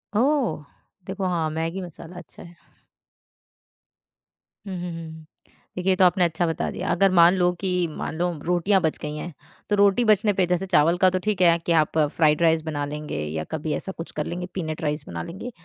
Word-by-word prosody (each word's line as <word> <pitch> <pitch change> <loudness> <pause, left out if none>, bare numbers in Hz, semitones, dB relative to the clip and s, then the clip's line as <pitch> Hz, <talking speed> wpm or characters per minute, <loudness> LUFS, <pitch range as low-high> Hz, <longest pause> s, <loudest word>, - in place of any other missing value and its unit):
ओह! 250 - +1 0.4
देखो 190 0 -4
हाँ, 165 -3 0
मैगी 165 +4 -3
मसाला 175 0 -10
अच्छा 155 -8 -12
है। 170 0 -14 2.1
हुँ, 195 -2 -5
हुँ, 175 0 -4
हुँ। 160 -1 -9 0.5
देखिए 185 +1 +2
तो 185 - +4
आपने 180 +1 +3
अच्छा 170 +1 0
बता 165 - -2
दिया - - -5
अगर 190 +2 +3
मान 170 0 +6
लो 180 -1 +2
कि 190 -1 -2 0.2
मान 155 0 -6
लो 175 +1 0
रोटियाँ 180 +3 +2
बच 160 -3 0
गई 150 0 -4
हैं, 160 +3 -6 0.4
तो 205 - +3
रोटी 200 +4 +3
बचने 210 -1 +3
पे 190 -1 +2
जैसे 180 +1 -1
चावल 170 -2 +3
का 185 +1 +5
तो 185 0 -1
ठीक 210 -3 -1
है 170 -2 +5
कि - - 0
आप 155 - -3
फ्राइड 150 0 +2
राइस 160 -1 +3
बना 145 -2 -2
लेंगे 150 - -5
या 80 +1 -4
कभी 155 0 -2
ऐसा 190 - -4
कुछ 165 - -7
कर 150 - -3
लेंगे, 175 +1 -4
पीनट 160 -3 -4
राइस 150 0 -2
बना 85 -1 -5
लेंगे। 195 +8 -7
175 Hz, 200 wpm, -24 LUFS, 160-185 Hz, 2.1 s, मान